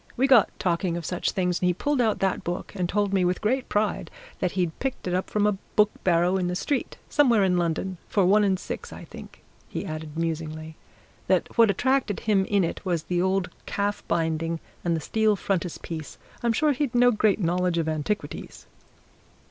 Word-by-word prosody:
We 260 - +3
got 255 -6 +6
talking 175 -1 0
of 170 - -6
such 180 +2 -1
things, 180 -3 0
and 180 - +3
he 180 - +2
pulled 290 +5 0
out 220 -3 +2
that 190 -1 0
book, 175 +2 -4
and 180 -3 -1
told 205 0 0
me 190 -2 +3
with 180 0 +1
great 250 +4 0
pride, 210 +1 0 0.3
that 180 -2 -1
he'd 175 -4 -1
picked 265 -7 -3
it 180 - -1
up 185 +1 -1
from 210 -1 +1
a 210 -2 +1 0.2
book 210 0 +5
barrow 175 +1 +3
in 180 -2 0
the 180 - -2
street, 270 +8 -2
somewhere 240 -8 +4
in 185 -1 +2
London, 175 +2 -2
for 200 -3 +3
one 210 +3 +5
and 190 -2 +2
six. - - -6
I - - -9
think," - - -12 0.3
he - - -4
added 155 0 -6
musingly, 160 -1 -3 0.5
"that - - +1
what 230 -2 +6
attracted 250 +1 +1
him 200 -3 +2
in 200 -1 +2
it 170 - -3
was 175 -5 -1
the 175 +1 0
old 190 -1 0 0.2
calf 205 0 -1
binding 165 0 0 0.2
and 170 -1 +1
the 160 - -3
steel 215 +5 +2
frontispiece 170 -5 -4 0.2
I'm 235 - +2
sure 300 +6 +2
he'd 270 -2 -1
no 245 0 +6
great 215 -2 +2
knowledge 180 -1 +1
of 165 -1 0
antiquities." 160 +7 -3
185 Hz, 200 wpm, -26 LUFS, 170-210 Hz, 0.5 s, got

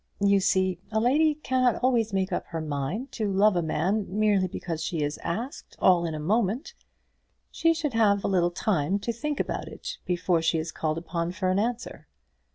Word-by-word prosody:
You 200 0 +4
see 185 -2 +1
a 220 - +1
lady 295 +7 +3
cannot 255 -4 +1
always 235 -4 +2
make 190 0 0
up - - -2
her 165 - -4
mind 155 - -3
to 215 -4 -2
love 200 +1 +4
a 175 - +2
man, 180 +6 0
merely 205 -1 +2
because 165 -2 -5
she 160 -2 -1
is 145 0 -3
asked 230 +11 -5
all 175 -2 +4
in 160 - -4
a - - -4
moment. 215 - 0 0.8
She 330 0 +2
should 300 -5 -2
have 205 -3 +3
a - - +1
little 180 -3 +2
time 175 -1 0
to 230 +3 -3
think 295 +5 -3
about - - -2
it - - -7
before 175 -1 +1
she 165 0 +1
is 160 0 -3
called 155 0 -2
upon 170 +1 -3
for 185 +1 0
an 190 - +2
answer." 235 +3 -3
195 Hz, 195 wpm, -27 LUFS, 170-230 Hz, 0.8 s, You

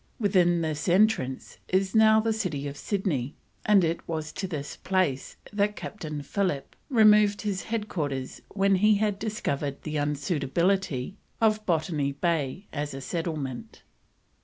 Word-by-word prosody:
Within 180 -5 +3
this 155 +1 -2
entrance 175 - +1
is 190 +1 +1
now 220 0 +6
the 220 0 +1
city 165 - -2
of 140 - -6
Sydney, 150 - -2 0.3
and 205 -3 +6
it 165 0 -1
was 155 -2 -3
to 190 - -3
this 150 -5 -5
place 185 -9 -1 0.2
that 205 0 +1
Captain 155 -10 -6
Phillip 180 -3 -2
removed 210 -4 +5
his 200 -3 -2
headquarters 155 - -3
when 195 -1 +2
he 210 +2 +5
had 205 -1 0
discovered 145 -10 -3
the 155 -1 -3
unsuitability 150 +3 0 0.2
of 215 -2 +2
Botany 155 -4 0
Bay 165 +3 -1
for 145 -2 -3
settlement. 150 -3 -4
175 Hz, 135 wpm, -27 LUFS, 145-205 Hz, 0.3 s, now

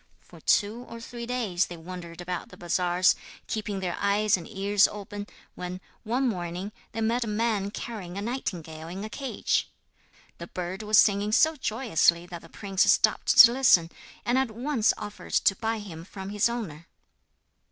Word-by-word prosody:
For - - -16
two 215 +3 +2
or 230 - -8
three 235 0 -7
days 215 -8 0
they 175 - -8
wandered 170 0 -8
about 175 0 -4
the - - -14
bazaars, 175 +1 +2 0.3
keeping 205 -3 -3
their 180 -2 -2
eyes 205 +1 +3
and 175 -3 -8
ears 200 +1 +3
open, 205 0 -7 0.3
when, 180 0 -6 0.2
one 250 +4 0
morning, 180 -1 -3 0.2
they 225 - -4
met 235 +2 +1
a - - -5
man 210 -2 0
carrying 200 -4 -6
a - - -3
nightingale 165 -10 -4
in 185 +4 -6
a 215 - -6
cage. 270 0 -1 0.7
The 170 - -7
bird 180 +2 -5
was 215 0 +3
singing 205 0 +4
so 315 +8 +4
joyously 215 - +2
that 175 -1 -8
the - - -15
prince 195 -2 +2
stopped - - +2
to 235 - +11
listen, 185 -11 +4 0.3
and 245 +2 +2
at 265 -2 0
once 235 +1 +1
offered 205 -1 -8
to 195 - +4
buy 225 +3 -2
him 175 -6 -8
from 190 +1 -8
his 210 +3 +2
owner. 170 -10 -5
205 Hz, 175 wpm, -27 LUFS, 180-230 Hz, 0.7 s, to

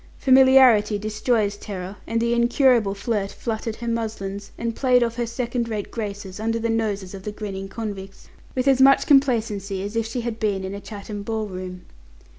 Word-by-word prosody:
Familiarity 260 -5 +6
destroys 215 0 0
terror, 195 -2 -6
and 230 - 0
the 235 +1 +1
incurable 235 -3 +3
flirt, 205 -1 -2
fluttered 225 -1 -4
her 235 - -7
muslins, 205 -3 -3
and 230 -1 -3
played 250 -2 +3
off 230 -1 -2
her 240 -1 -1
second 235 0 -2
rate 210 -2 -4
graces, 205 -3 -5
under 225 +1 0
the 230 0 -1
noses 205 -4 -2
of 195 - -8
the 210 - -5
grinning 195 -2 -6
convicts, 195 -2 -7 0.3
with 255 +1 0
as 265 -1 +4
much 275 +1 +6
complacency 220 -8 +2
as 205 +2 -5
if 230 -1 0
she 240 +2 -3
had 230 -1 -4
been 200 -3 0
in 190 +1 -5
a 200 - -6
Chatham 205 -1 -7
ball 220 +1 -2
room. 185 -2 -7
220 Hz, 185 wpm, -23 LUFS, 200-235 Hz, 0.3 s, Familiarity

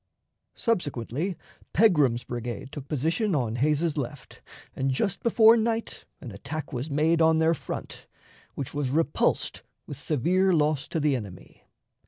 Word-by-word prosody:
Subsequently, 165 - -2 0.4
Pegram's 150 - +4
brigade 120 +2 -5
took 140 -2 -8
position 165 - 0
on 120 -4 -1
Hays's 150 +4 +1
left, 140 0 -6 0.3
and 135 +1 -1
just 175 +9 -1
before 230 -1 +6
night 225 0 -2 0.2
an 120 - -8
attack 140 +9 -6
was 130 +5 -3
made 160 +3 +2
on 160 0 +5
their 160 +1 +3
front, 160 - -7 0.5
which 140 - -5
was 145 -3 -1
repulsed 155 +2 0 0.2
with 145 - -6
severe 175 +7 +1
loss 150 -2 +1
to 165 - -2
the 150 -2 +2
enemy. 100 -7 -9
150 Hz, 140 wpm, -26 LUFS, 130-170 Hz, 0.5 s, before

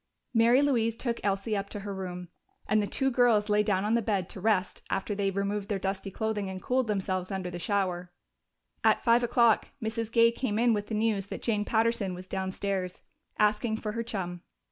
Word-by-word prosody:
Mary 235 +4 +5
Louise 230 -5 +2
took 235 0 -2
Elsie 200 +2 0
up 200 0 -3
to 205 - -6
her 200 0 -5
room, 180 -2 -6 0.4
and 215 +1 +3
the 205 - -1
two 270 +4 0
girls 235 -4 +3
lay 210 0 +4
down 205 -3 +1
on 215 - +1
the 235 - +3
bed 200 -5 -1
to 190 - -8
rest 200 -3 +1
after 195 +2 -1
they 200 0 -1
had 195 - -2
removed 200 0 -2
their 205 - 0
dusty 195 +1 -3
clothing 210 -1 -2
and 190 0 -5
cooled 255 +4 0
themselves 185 -3 -1
under 185 -2 -3
the 175 - -5
shower. 180 -1 -1 0.7
At - - +3
five 235 0 +5
o'clock 235 -2 +3
Mrs. 220 0 -3
Gay 230 0 +5
came 235 -3 -2
in 235 0 +4
with 205 -1 -2
the 220 - -3
news 210 -3 0
that - - -7
Jane 210 -3 0
Patterson 220 -4 +1
was 185 +1 -9
downstairs, 190 -1 -3 0.3
asking 215 +1 +2
for 215 -1 -4
her 230 +2 -3
chum. 185 -6 -4
210 Hz, 210 wpm, -29 LUFS, 195-230 Hz, 0.7 s, Mary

